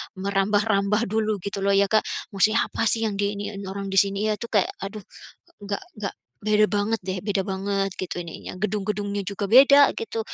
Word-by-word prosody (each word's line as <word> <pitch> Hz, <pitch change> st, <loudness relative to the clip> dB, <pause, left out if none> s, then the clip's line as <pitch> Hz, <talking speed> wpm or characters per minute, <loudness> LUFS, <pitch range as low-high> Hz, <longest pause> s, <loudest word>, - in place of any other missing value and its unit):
merambah-rambah 200 Hz, +2 st, +1 dB
dulu 215 Hz, -1 st, +1 dB
gitu 200 Hz, 0 st, -4 dB
loh 200 Hz, 0 st, +2 dB
ya, 200 Hz, 0 st, +3 dB
Kak, 215 Hz, -, +4 dB, 0.3 s
maksudnya 215 Hz, +3 st, +3 dB
apa 225 Hz, -, -1 dB
sih, 225 Hz, +2 st, +1 dB
yang 205 Hz, -2 st, -3 dB
di 205 Hz, 0 st, 0 dB
iniin 200 Hz, 0 st, -6 dB
orang 195 Hz, 0 st, -5 dB
di 195 Hz, -, +5 dB
sini 200 Hz, +2 st, +1 dB
ya, 210 Hz, -, -3 dB
itu 235 Hz, -, -5 dB
kayak 205 Hz, -4 st, +1 dB
aduh 200 Hz, +1 st, -6 dB, 0.6 s
enggak 200 Hz, 0 st, -3 dB
enggak 210 Hz, -2 st, -4 dB, 0.3 s
beda 215 Hz, 0 st, +4 dB
banget 210 Hz, +2 st, 0 dB
deh, 185 Hz, +1 st, -3 dB
beda 200 Hz, -2 st, 0 dB
banget 195 Hz, 0 st, -1 dB
gitu 180 Hz, -1 st, -4 dB
ininya, 170 Hz, +1 st, -8 dB
gedung-gedungnya 205 Hz, 0 st, -2 dB
juga 200 Hz, 0 st, -3 dB
beda 280 Hz, +4 st, +8 dB
gitu. 455 Hz, 0 st, -4 dB
205 Hz, 185 wpm, -24 LUFS, 195-215 Hz, 0.6 s, beda